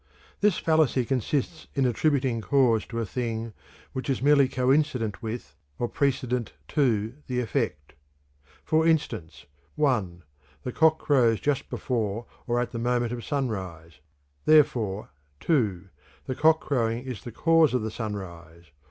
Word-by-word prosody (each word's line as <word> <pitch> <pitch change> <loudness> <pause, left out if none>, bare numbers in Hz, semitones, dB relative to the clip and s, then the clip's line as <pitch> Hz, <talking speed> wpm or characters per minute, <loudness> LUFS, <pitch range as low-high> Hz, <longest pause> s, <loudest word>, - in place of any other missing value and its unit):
_ - - -39
This 205 -3 +3
fallacy 155 -6 +2
consists 135 +5 -2
in 135 -2 +2
attributing 130 -1 +1
cause 125 -3 +2
to 115 - -6
a 115 - -1
thing 115 -1 -3 0.4
which 130 +1 -4
is 135 - +1
merely 140 -1 +5
coincident 130 -4 +1
with, 110 -10 -6 0.2
or 120 - -1
precedent 125 -4 -1 0.2
to, 115 -6 +1
the 125 -1 -1
effect. 115 - -2 0.7
For 160 +1 +3
instance: 150 - -1 0.3
(1) 105 - 0 0.4
The - - -3
cock 160 +3 +4
crows 120 -7 +3
just 145 -2 -1
before 115 -2 -2 0.2
or 120 0 +1
at 120 - -2
the 115 - -4
moment 120 0 0
of 120 -1 -5
sunrise; 95 - -4 0.5
therefore 115 - +3 0.3
(2) 100 - 0 0.4
the - - -2
cock 160 +4 +4
crowing 120 -3 -1
is 130 -4 -7
the 120 - -7
cause 165 +1 +3
of 125 - 0
the 110 - -3
sunrise. 85 -7 -7
120 Hz, 145 wpm, -26 LUFS, 110-140 Hz, 0.7 s, merely